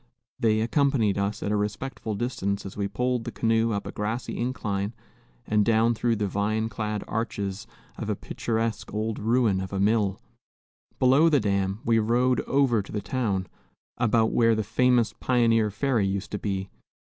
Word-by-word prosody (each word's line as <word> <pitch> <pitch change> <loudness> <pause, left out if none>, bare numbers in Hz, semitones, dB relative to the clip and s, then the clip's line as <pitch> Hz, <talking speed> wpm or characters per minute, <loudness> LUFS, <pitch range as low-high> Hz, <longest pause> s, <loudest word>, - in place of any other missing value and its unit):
They 110 -1 +2
accompanied 115 -4 +2
us, 100 +1 -2
at 105 - -1
a - - +2
respectful 105 +2 -3
distance, 100 -4 -2
as 95 - -7
we 100 -1 -1
pulled 125 +4 -1
the - - -5
canoe 115 0 +1
up 100 -1 -2
a - - -5
grassy 110 +4 -3
incline 105 -4 -2 0.5
and 105 -1 +2
down 115 +1 +3
through 115 0 0
the 105 -1 -1
vine 110 +3 -1
clad 105 -2 -3
arches 100 -3 -3 0.3
of - - -4
a - - 0
picturesque 110 -3 -3
old 110 +1 -2
ruin 110 -3 +2
of 95 - -6
a 100 - -2
mill. 100 -1 +2 0.8
Below 135 +6 +5
the 145 -3 +4
dam, 100 -1 -1
we 115 -1 +3
rowed 125 +3 +2
over 135 -5 +3
to 100 - -11
the 105 - -2
town, 105 -3 -1 0.5
about 115 -2 +2
where 115 -1 +4
the 110 - -1
famous 120 +2 +2
pioneer 115 -3 +3
ferry 110 -1 0
used 100 +1 -3
to 105 - -3
be. 95 -2 -3
110 Hz, 170 wpm, -26 LUFS, 100-120 Hz, 0.8 s, Below